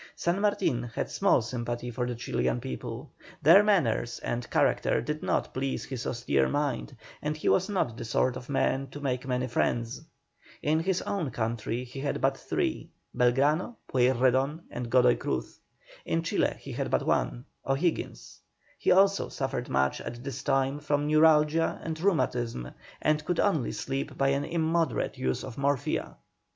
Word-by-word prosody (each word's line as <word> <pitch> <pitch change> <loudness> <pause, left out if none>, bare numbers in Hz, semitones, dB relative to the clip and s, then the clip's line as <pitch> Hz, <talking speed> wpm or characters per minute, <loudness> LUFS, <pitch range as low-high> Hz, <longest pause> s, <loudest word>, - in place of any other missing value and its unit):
San 175 +3 0
Martin 205 - +1
had 120 -1 -4
small 195 - +3
sympathy 120 0 -4
for 120 +1 -2
the 125 - -3
Chilian 65 - -1
people; 65 0 -6 0.3
their 170 +7 +9
manners 145 - +1
and 120 0 -3
character - - +2
did 150 +1 -3
not - - -1
please 135 +1 -2
his 130 -3 -5
austere 70 - +1
mind, 145 -3 -2 0.2
and 150 +1 -2
he - - -4
was 190 +2 +3
not 180 - 0
the - - -6
sort 120 +2 +1
of 125 +1 -8
man 135 0 +1
to 145 - -9
make 130 -2 -2
many 125 0 0
friends. 120 +1 -1 0.6
In 155 +2 +2
his 185 +2 0
own 180 -8 -2
country 115 +1 -2
he 125 +2 -9
had 140 +1 -2
but 135 0 +2
three, - - -2 0.3
Belgrano, 140 - +2
Pueyrredon, 130 +4 +2
and 120 -1 -5
Godoy 125 -1 +5
Cruz; - - -3 0.4
in 165 0 -1
Chile 165 - +1
he - - -9
had - - -2
but - - +1
one, - - 0 0.2
O'Higgins. 150 +5 -2 0.4
He - - 0
also 195 +1 +4
suffered 130 -2 -3
much 70 0 +1
at 120 0 -7
this 140 0 -5
time 135 0 +1
from 145 0 0
neuralgia 155 +1 +4
and 160 -1 -4
rheumatism, 120 - 0 0.3
and 150 0 +2
could 175 +2 -1
only 160 - +2
sleep 135 +1 -4
by 135 0 +3
an 140 +1 0
immoderate 165 -4 0
use 65 0 -1
of 130 -1 -7
morphia. 140 -1 -1
135 Hz, 165 wpm, -28 LUFS, 120-155 Hz, 0.6 s, their